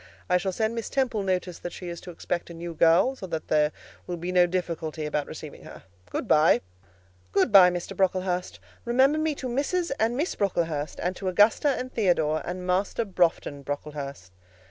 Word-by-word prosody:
I 180 - +6
shall 190 +1 -2
send 220 +4 -1
Miss 230 -2 -4
Temple 255 -6 0
notice 185 -2 -2
that 175 - -6
she 180 - -8
is 170 -1 -6
to - - -10
expect 175 0 -4
a 170 - -9
new 170 0 -6
girl, 170 +11 +4
so 190 - -8
that 160 -2 -5
there 150 0 +3 0.4
will 175 - -3
be 175 +2 -4
no 180 -1 +5
difficulty 165 -3 -3
about 150 -1 -2
receiving - - -9
her. - - -12 0.3
Good - - -3
bye." 155 -4 +5 0.7
"Good 225 - +2
bye, 190 -3 +9
Mr. 175 +2 -5
Brocklehurst; 185 -1 0 0.2
remember 265 +5 +3
me 310 -1 0
to 260 - -5
Mrs. 290 +8 -1
and 230 +3 +1
Miss 315 +6 0
Brocklehurst, 165 -6 -1
and 180 +1 -1
to 195 - -4
Augusta 205 +9 +4
and 255 0 -5
Theodore, 160 -7 +2
and 180 +1 -5
Master 190 +5 0
Broughton 170 -6 0
Brocklehurst." 140 -8 -6
180 Hz, 190 wpm, -26 LUFS, 165-220 Hz, 0.7 s, bye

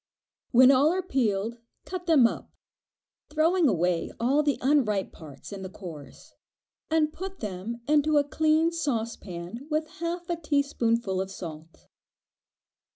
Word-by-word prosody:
When 255 +2 +7
all 275 +4 +4
are 370 +1 -1
peeled, 230 - -1 0.3
cut 360 -1 -6
them 305 -7 +6
up, 230 - -1 0.8
throwing 320 +3 +3
away 175 -3 +1
the 285 +4 +2
unripe 245 -8 +1
parts 145 -2 -12
and 195 -1 -7
the 190 - -6
cores, 165 -7 -11 0.6
and 315 -1 +2
put 380 +1 -7
them 210 +3 -5
into 300 0 +3
a 290 - +5
clean 315 +3 +2
saucepan 230 - -4
with 310 0 0
half 340 +1 -3
a 345 - -1
teaspoonful 235 - 0
of 190 - -4
salt. 165 -3 -9
260 Hz, 130 wpm, -27 LUFS, 195-310 Hz, 0.8 s, When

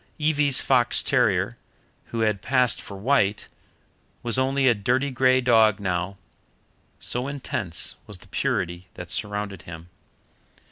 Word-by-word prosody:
Evie's 150 -3 +3
fox 120 -3 +3
terrier, - - +1 0.5
who 115 - -4
had 105 -3 0
passed 130 -2 +2
for 100 - -9
white, 105 -2 +1 0.8
was 120 +1 +2
only 135 +1 +1
a 120 - +6
dirty 125 +6 0
grey 130 0 +3
dog 110 -4 +4
now, 95 0 -2 0.8
so 125 +2 -3
intense 125 - -2
was - - -7
the - - -18
purity 85 +2 -2
that 90 -1 -8
surrounded 105 -3 -3
him. 85 +1 -11
115 Hz, 130 wpm, -24 LUFS, 100-130 Hz, 0.8 s, a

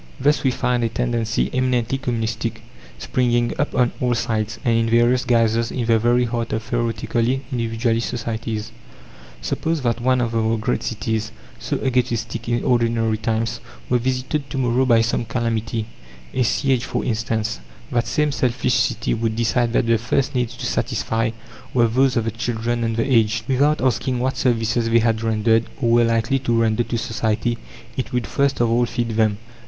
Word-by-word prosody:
Thus 145 +3 +2
we 135 - +4
find 125 -1 0
a 115 - +1
tendency, 115 -1 -1
eminently 130 0 0
communistic, 115 -3 -3 0.3
springing 120 - +1
up 145 - -1
on 120 -1 +3
all 125 -1 +2
sides, 110 -1 -1
and 115 -1 +3
in 115 0 +1
various 120 +2 +3
guises, 115 -1 +2
in 125 -3 -2
the 115 -1 +3
very 120 +2 +3
heart 115 -1 -3
of 110 0 -1
theoretically 115 +2 -1
individualist 115 -1 0
societies. 115 -1 -4 0.7
Suppose 160 - -2
that 120 -1 0
one 130 +1 +2
of 115 -2 -1
our 115 0 +1
great 110 +3 -1
cities, 110 0 -2 0.3
so - - -2
egotistic 120 -2 -1
in 120 0 0
ordinary 115 -2 +1
times, 115 0 -1 0.3
were 125 - +4
visited 130 +3 -2
to - - -4
morrow 130 0 +2
by 115 -2 +5
some 115 +1 0
calamity 115 -1 -2 0.5
a 130 - 0
siege, 125 +3 +1
for - - -3
instance 110 -1 -1 0.3
that 120 -1 0
same 150 +3 +1
selfish 125 -2 0
city 120 +2 +1
would 110 -1 -1
decide 120 +1 +1
that - - +2
the 115 -1 +3
first 125 +3 0
needs 125 -1 -1
to - - -5
satisfy 115 0 -1 0.5
were 120 -2 +5
those 130 +3 +2
of 115 - +1
the 115 - -1
children 115 +1 -2
and 115 -1 -1
the 115 - +1
aged. 115 -4 +2
Without 145 +3 +2
asking 130 0 +1
what 130 +2 -1
services 115 -1 +1
they 115 - +4
had 115 -1 +2
rendered, 115 0 +2
or 120 -4 +1
were 120 0 +5
likely 115 +3 +1
to 120 -3 +1
render 110 0 +2
to 120 0 -2
society, 115 0 -1 0.4
it 130 - -3
would 125 -1 -1
first 140 0 0
of 120 - +3
all 120 +1 +2
feed 120 0 -2
them. 110 -2 +1
115 Hz, 180 wpm, -21 LUFS, 115-125 Hz, 0.7 s, by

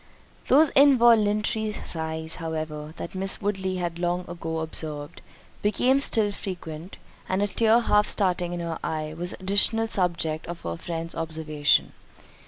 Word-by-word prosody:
Those 290 +3 +5
involuntary 220 -5 +4
sighs, 160 -3 -4
however, 155 -2 -5
that - - -6
Miss 190 +1 -1
Woodley 190 -2 -2
had 175 -2 -3
long 175 0 -1
ago 165 -1 -4
observed, 155 -1 -5 0.4
became 250 +6 +3
still 230 -5 +3
more 205 - -1
frequent; 175 -3 -7 0.3
and 190 +2 +1
a - - +1
tear 225 +3 +3
half 210 -2 +3
starting 180 -3 0
in 175 0 -4
her 165 -1 -4
eye 155 -1 -3
was 175 +2 -2
an - - -11
additional 205 +4 +2
subject 170 -6 0
of 170 0 -6
her 85 - -4
friend's 165 - -5
observation. 155 -2 +1
175 Hz, 150 wpm, -25 LUFS, 160-210 Hz, 0.4 s, Those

